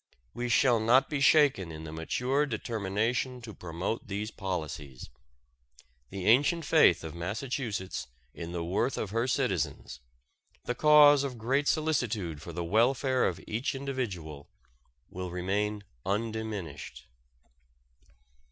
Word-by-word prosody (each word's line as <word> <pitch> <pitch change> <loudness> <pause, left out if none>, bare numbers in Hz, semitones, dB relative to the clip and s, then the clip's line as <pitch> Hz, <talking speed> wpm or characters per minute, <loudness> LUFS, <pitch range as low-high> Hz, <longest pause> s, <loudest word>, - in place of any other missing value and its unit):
We 120 0 -3
shall 120 0 +4
not 120 +7 +4
be 145 -2 -1
shaken 140 - +4
in 80 0 -8
the 80 - -7
mature 125 - 0
determination 115 +2 -2
to 110 -3 -8
promote 90 +6 -4
these 105 +2 -4
policies. 80 - -5 1.0
The 95 -1 -6
ancient 145 +8 +4
faith 155 - +5
of 80 - -6
Massachusetts 105 - -4 0.3
in 85 0 -7
the 85 -1 -3
worth 100 +9 0
of 100 - -3
her 115 +3 0
citizens, 95 - -1 0.7
the 125 - -1
cause 145 0 +7
of 130 -3 -4
great 135 +6 0
solicitude 120 - 0
for 85 - -8
the 85 +1 -4
welfare 125 +7 +2
of - - -3
each 115 +5 -2
individual, 100 - -5 0.6
will 90 0 -5
remain 100 +4 -2 0.2
undiminished. 100 - -4
110 Hz, 125 wpm, -29 LUFS, 90-130 Hz, 1.0 s, cause